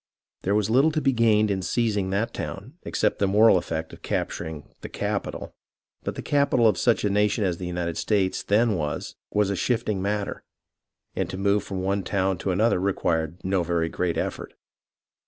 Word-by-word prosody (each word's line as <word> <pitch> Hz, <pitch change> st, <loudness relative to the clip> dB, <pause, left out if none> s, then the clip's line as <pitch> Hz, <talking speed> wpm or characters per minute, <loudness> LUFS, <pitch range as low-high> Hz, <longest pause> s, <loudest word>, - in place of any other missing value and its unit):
There 100 Hz, +2 st, +1 dB
was 105 Hz, 0 st, +1 dB
little 135 Hz, +6 st, +5 dB
to 155 Hz, -, +1 dB
be 135 Hz, -2 st, +2 dB
gained 110 Hz, -3 st, +3 dB
in 95 Hz, -1 st, -1 dB
seizing 105 Hz, -1 st, 0 dB
that 100 Hz, +4 st, -1 dB
town 100 Hz, +8 st, -6 dB
except -, -, -1 dB
in 100 Hz, -, +4 dB
the -, -, -1 dB
moral 110 Hz, +1 st, +6 dB
effect 80 Hz, -2 st, -2 dB
of -, -, -12 dB
capturing 80 Hz, -3 st, -3 dB
"the -, -, -7 dB
capital"; -, -, -3 dB, 0.5 s
but -, -, -3 dB
the -, -, -6 dB
capital 140 Hz, -5 st, +3 dB
of 100 Hz, -5 st, +2 dB
such 120 Hz, -2 st, +2 dB
a -, -, +2 dB
nation 105 Hz, +1 st, +2 dB
as 90 Hz, -3 st, 0 dB
the 90 Hz, -, -4 dB
United 85 Hz, -1 st, -3 dB
States 100 Hz, -3 st, +1 dB
then 110 Hz, +2 st, +2 dB
was, 75 Hz, -2 st, -3 dB
was 105 Hz, -1 st, +1 dB
a -, -, 0 dB
shifting 105 Hz, -2 st, 0 dB
matter, 100 Hz, +1 st, -2 dB, 0.7 s
and -, -, -1 dB
to 95 Hz, -, -5 dB
move 100 Hz, +1 st, +2 dB
from 95 Hz, -2 st, -4 dB
one 100 Hz, +1 st, 0 dB
town 95 Hz, -1 st, 0 dB
to 95 Hz, -, -2 dB
another 100 Hz, +2 st, +2 dB
required 85 Hz, -4 st, 0 dB
no 95 Hz, 0 st, +1 dB
very 85 Hz, -1 st, 0 dB
great 90 Hz, -1 st, -1 dB
effort. -, -, -4 dB
100 Hz, 190 wpm, -25 LUFS, 90-110 Hz, 0.7 s, moral